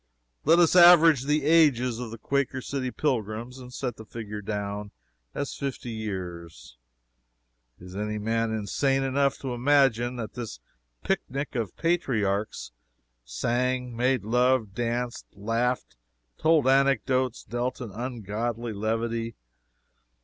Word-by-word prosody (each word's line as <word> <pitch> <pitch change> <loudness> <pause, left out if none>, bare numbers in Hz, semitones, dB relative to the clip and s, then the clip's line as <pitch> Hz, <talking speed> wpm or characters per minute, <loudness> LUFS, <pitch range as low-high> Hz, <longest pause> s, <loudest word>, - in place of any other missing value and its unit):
Let 165 +3 +6
us 175 0 +4
average 165 -6 +8
the 150 0 +1
ages 135 -7 +4
of 125 -2 -5
the 115 - -8
__Quaker 140 +3 -1
City__'s 130 -1 -4
pilgrims 120 -2 -2
and 125 -1 -10
set 125 -2 -4
the 110 - -9
figure 105 -2 -6
down 105 0 -4 0.5
as 140 - -3
fifty 135 -3 -5
years. 90 - -6 1.0
Is 90 +1 -11
any 105 +1 -2
man 115 +2 0
insane 135 +6 0
enough 140 +1 +1
to 130 -2 -3
imagine 125 -2 +3
that 115 -3 -5
this 115 - -6 0.4
picnic 135 +3 -2
of 115 -7 -3
patriarchs 110 - 0 0.5
sang, 125 - -1
made 125 -1 +1
love, 125 -1 +2
danced, 120 +2 -2
laughed, 115 - -1 0.4
told 155 -4 +3
anecdotes, 130 -2 +2
dealt 120 +2 -3
in 115 -5 -6
ungodly 115 0 -4
levity? 115 +2 -2
120 Hz, 120 wpm, -27 LUFS, 110-135 Hz, 1.0 s, average